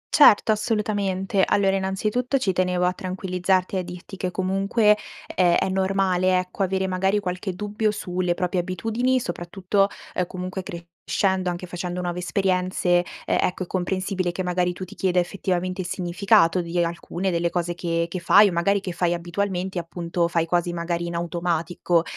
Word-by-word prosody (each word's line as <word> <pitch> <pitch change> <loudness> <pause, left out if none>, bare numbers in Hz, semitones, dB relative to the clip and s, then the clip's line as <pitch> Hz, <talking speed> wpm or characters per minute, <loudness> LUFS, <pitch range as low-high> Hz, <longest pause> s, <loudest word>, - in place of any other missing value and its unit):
Certo, 225 -7 +7
assolutamente. 205 -3 0
Allora 195 -1 +3
innanzitutto 210 +7 0
ci 195 -8 0
tenevo 180 -1 +1
a 180 - +2
tranquillizzarti 185 0 -1
e - - +1
a - - 0
dirti 180 +2 -9
che 185 -1 -2
comunque 195 +4 +2 0.3
è 175 -2 +2
è 195 - 0
normale, 190 -1 +2
ecco, 180 +2 -4
avere 190 0 +1
magari 190 +2 +1
qualche 185 -1 -3
dubbio, 210 +3 -1
sulle 180 -4 -1
proprie 180 0 -1
abitudini, 225 +8 0
soprattutto, 190 +1 0 0.3
uhm, 180 -1 -1
comunque 185 +1 -5
crescendo, 180 +2 -2
anche 175 +1 -4
facendo 180 0 -4
nuove 175 0 -3
esperienze, 180 -1 +1 0.2
uhm, - - +2
ecco 185 +1 -1
è - - -9
comprensibile 185 0 -1
che 185 +1 -3
magari 180 0 +1
tu 185 - -7
ti 200 - -12
chieda 185 -1 +1
effettivamente 185 0 -1
il 175 - -5
significato 185 0 +2
di 170 +1 -4
alcune 170 +2 -3
delle 170 0 +1
cose 175 -1 -1
che 170 -1 -1
che 180 +2 -4
fai, 200 +4 +6
o - - -4
magari 195 +4 +1
che 185 -3 -4
fai 175 0 0
abitualmente, 180 +1 -2
appunto, 170 0 -2
fai 165 -1 +1
quasi 175 0 0
magari 170 0 -2
in 170 - -4
automatico. 170 0 0
185 Hz, 170 wpm, -24 LUFS, 175-195 Hz, 0.3 s, Certo